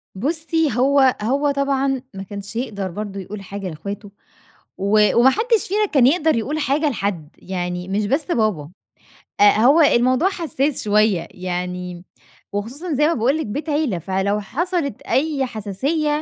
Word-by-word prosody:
بُصّّي 320 - 0
هو 265 0 +4
هو 275 +6 +1
طبعًا 275 -1 0
ما 195 0 -6
كانش 200 +2 -8
يقدر 200 -6 -3
برضه 200 +1 -5
يقول 200 +2 -7
حاجة 195 0 -6
لإخواته 200 +6 -7 0.7
و 210 +2 +3
وما 240 +3 +6
حدش 450 - +1
فينا 420 +3 +1
كان 275 -10 +4
يقدر 315 +1 +3
يقول 275 +7 -2
حاجة 295 +1 +1
لحد 195 - -3
يعني 180 -1 -4
مش 200 +2 -1
بس 275 +9 0
بابا، 215 - -1 0.7
آآ، - - +7
هو 255 +9 +5
الموضوع 255 +3 +4
حسّاس 315 -6 -2
شوية 210 -4 +2
يعني 180 -1 -5 0.5
وخصوصًا 250 - -4
زي 300 +2 +3
ما 335 - +2
باقول 255 +5 +1
لِك 315 - -3
بيت 285 +10 -5
عِيلة 290 - 0
فلو 195 +4 -1
حصلت 320 - -2
أي 280 -1 0
حساسية 250 - -2
235 Hz, 150 wpm, -21 LUFS, 200-295 Hz, 0.7 s, آآ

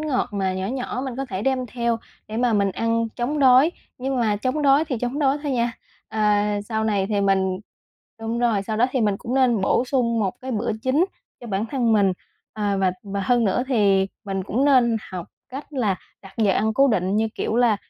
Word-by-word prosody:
ngọt 300 -4 0
mà 195 -2 0
nhỏ 190 +1 -2
nhỏ 255 +1 -3
mình 260 -2 -5
có 270 - -2
thể 195 -4 -5
đem 260 -1 0
theo 235 0 -1 0.3
để 220 - -5
mà 245 -1 +2
mình 200 -2 +2
ăn 230 0 0
chống 270 +5 -1
đói. 265 +4 +6 0.3
Nhưng 265 +1 -2
mà 215 -3 +1
chống 255 +7 -1
đói 280 +2 +5
thì 270 -7 -3
chống 245 +5 -2
đói 280 0 +2
thôi 285 -2 -1
nha, 235 -1 0 0.4
ờ, 220 0 -4 0.5
sau 220 -1 -1
này 200 -3 +1
thì 205 -1 0
mình 190 -1 +1 0.6
đúng 225 +1 -2
rồi, 230 -5 +2
sau 215 +1 -3
đó 245 - +4
thì 255 - 0
mình 205 -2 +2
cũng 240 - -5
nên 250 -5 +3
bổ 195 +5 +2
sung 245 -3 0
một 195 -3 0
cái 260 - -5
bữa 225 +2 -1
chính 275 +7 +3 0.4
cho 240 - -9
bản 205 +1 -1
thân 240 -3 +1
mình. 200 -3 +4 0.4
À, 205 -2 -1
và 190 -1 +2
và 200 -1 -4
hơn 240 +4 +2
nữa 205 +4 +1
thì 200 -6 +3 0.2
mình 195 -1 -2
cũng 240 +8 0
nên 250 -5 +4
học 180 -3 -6 0.2
cách 275 +4 -8
là 220 -9 0 0.3
đặt 195 -1 -13
giờ 205 -3 +3
ăn 220 +3 +1
cố 275 0 +5
định 190 -2 +1
như 220 0 +1
kiểu 225 - -2
là 235 -4 +4
230 Hz, 225 wpm, -23 LUFS, 200-255 Hz, 0.6 s, đói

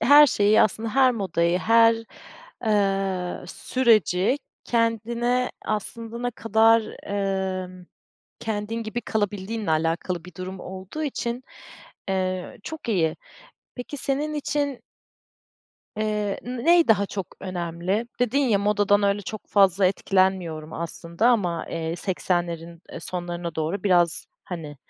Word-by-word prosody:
her 295 +1 +8
şeyi 210 -3 +4
aslında 220 +2 0
her 265 -1 +6
modayı, 180 -5 0
her, 230 +2 +5 0.7
eee, 195 -4 0
süreci 220 - +2 0.3
kendine 235 +2 0
aslında 225 +2 -4
ne 245 0 -1
kadar, 225 0 +4 0.2
emm 190 -2 -2 0.5
Kendin 220 0 -3
gibi 225 +2 -4
kalabildiğinle 205 -2 -2
alakalı 165 +2 0
bir 180 - -12
durum 185 +2 -6
olduğu 190 +12 -7
için, 250 -4 -3 0.7
eee, 185 -1 -2
çok 315 -6 -7
iyi. 165 -8 +1 0.6
Peki 250 +4 -6
senin 285 +3 -1
için 285 -3 -1 1.2
eee 210 -2 -1
n 245 0 -5
ney 340 -2 +5
daha 205 -2 +4
çok 195 -2 -4
önemli? 180 +4 -2
Dedin 245 +2 +2
ya, 245 -8 +3
"Modadan 205 0 +3
öyle 200 0 +2
çok 215 +2 -7
fazla 195 -2 +4
etkilenmiyorum 185 -5 0
aslında 170 +5 -1
ama, 180 -9 +1
eee, 165 0 -3
80'lerin, 170 -3 -2
eee, - - -6
sonlarına 175 -1 -4
doğru 160 +5 -2
biraz, 175 -4 +3 0.2
hani, 160 -5 -7
200 Hz, 120 wpm, -24 LUFS, 180-230 Hz, 1.2 s, her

